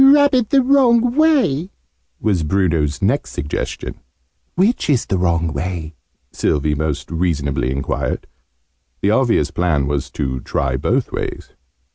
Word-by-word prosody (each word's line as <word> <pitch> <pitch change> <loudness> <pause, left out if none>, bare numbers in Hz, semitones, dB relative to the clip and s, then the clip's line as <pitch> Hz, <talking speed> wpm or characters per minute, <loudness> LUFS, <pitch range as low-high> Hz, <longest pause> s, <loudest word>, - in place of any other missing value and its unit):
"Rub 285 +1 +6
it 245 -4 +2
the 270 -2 +4
wrong 245 -3 +4
way," 270 - +2 0.5
was 100 -6 +1
Bruno's 80 -2 0
next 125 +9 0
suggestion. 75 +1 -4 0.6
"Which 195 +1 +1
is 130 -5 +2
the 95 - -1
wrong 85 -3 0
way?", 80 +1 -4 0.4
Sylvie 75 0 0
most 75 0 -3
reasonably 75 -6 -1
enquired. 65 +1 -2 0.8
The 100 - +2
obvious 115 - +2
plan 85 -6 +1
was 70 -1 -2
to 65 -2 -2
try - - -2
both - - 0
ways. - - -5
90 Hz, 130 wpm, -19 LUFS, -, 0.8 s, Rub